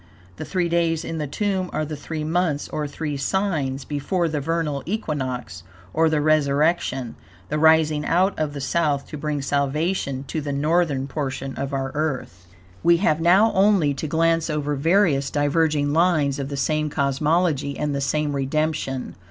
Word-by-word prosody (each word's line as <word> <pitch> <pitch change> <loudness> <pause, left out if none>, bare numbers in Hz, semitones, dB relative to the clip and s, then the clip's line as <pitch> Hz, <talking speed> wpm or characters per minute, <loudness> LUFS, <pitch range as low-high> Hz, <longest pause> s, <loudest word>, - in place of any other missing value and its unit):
The - - -5
three 180 -2 0
days 170 -1 0
in 165 - -4
the 150 - -2
tomb 190 +3 -1
are 155 - -1
the 155 0 -5
three 155 +1 -5
months, 160 -2 0
or 150 -1 -3
three 150 0 -4
signs, 145 -6 -1
before 165 +5 -1
the 150 -2 -2
vernal 155 -2 -1
equinox, 130 - -3 0.3
or 160 +1 +3
the 155 -1 +1
resurrection, 145 -3 +1 0.4
the 150 - -1
rising 160 -1 +4
out 185 +5 +2
of 150 -2 -1
the 140 - -5
South 145 -1 0
to 150 - -6
bring 150 -2 -2
salvation 140 0 -1
to 155 +3 -4
the 145 -1 -3
northern 150 -1 +1
portion 135 -2 -4
of 135 0 -4
our 135 -1 -2
Earth. 130 - -3 0.3
We 170 0 +5
have 165 -4 +1
now 190 +7 +5
only 190 -7 +3
to 145 +3 -4
glance 165 +1 +1
over 150 -1 -1
various 150 -2 +2
diverging 145 0 +1
lines 155 -4 +2
of 135 0 -3
the 140 - -4
same 155 +2 0
cosmology 145 +1 0
and 150 -1 -1
the 140 - -2
same 150 +1 0
redemption. 140 -1 -2
150 Hz, 170 wpm, -23 LUFS, 140-165 Hz, 0.4 s, We